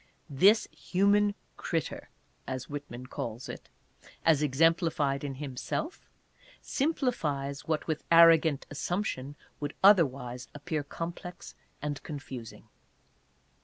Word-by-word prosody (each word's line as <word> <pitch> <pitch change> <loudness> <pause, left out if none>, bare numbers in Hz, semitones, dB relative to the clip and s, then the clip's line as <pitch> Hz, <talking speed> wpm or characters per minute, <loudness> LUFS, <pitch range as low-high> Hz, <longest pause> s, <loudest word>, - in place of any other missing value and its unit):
This 195 +11 +5
" - - -38 0.2
human 200 +2 +4 0.2
critter," 165 -5 -3 0.4
as 130 -1 -4
Whitman 145 -4 -7
calls 120 -1 -5
it, - - -9 0.6
as 155 -3 +5
exemplified 150 -1 +2
in 140 -2 -4
himself, 145 - -4 0.5
simpli 275 -3 0
fies 140 -5 -3
what, 155 -1 0
with 155 -2 -2
arrogant 165 -3 +6
assumption, 145 -3 -3 0.2
would 145 0 -4
otherwise 130 - +4
appear 150 +1 -2
complex 170 +4 -7 0.3
and 145 -1 -3
confusing. 135 -6 -8
150 Hz, 105 wpm, -30 LUFS, 135-170 Hz, 0.6 s, arrogant